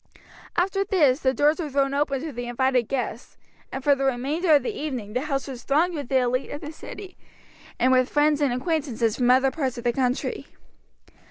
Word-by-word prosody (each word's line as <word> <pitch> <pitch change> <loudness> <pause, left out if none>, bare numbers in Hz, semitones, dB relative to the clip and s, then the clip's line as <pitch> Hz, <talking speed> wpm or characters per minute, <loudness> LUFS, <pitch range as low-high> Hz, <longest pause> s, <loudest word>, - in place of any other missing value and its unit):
After 390 +2 +1
this 310 -10 +3
the 260 -4 +2
doors 295 +5 +2
were 315 -4 -3
thrown 275 0 +1
open 280 -2 0
to 320 - -4
the 245 -1 -6
invited 250 -1 +1
guests, 245 -3 -4 0.3
and 265 - -5
for 285 - +5
the 275 0 -2
remainder 285 +6 +2
of 280 - +3
the - - -3
evening 250 -9 -5
the 250 - 0
house 275 -2 -2
was 255 -3 -7
thronged 315 +8 +1
with 285 -6 -5
the 265 - +3
elite 255 +1 0
of 290 - -6
the 300 - -6
city, 380 +4 -10 0.6
and 255 - +3
with 255 0 +3
friends 295 0 +2
and 280 -3 +2
acquaintances 250 -5 -1
from 245 -1 +2
other 260 +1 +4
parts 265 -5 -2
of 240 - -6
the 240 -1 +1
country. 255 -1 -1
270 Hz, 205 wpm, -24 LUFS, 250-300 Hz, 0.6 s, for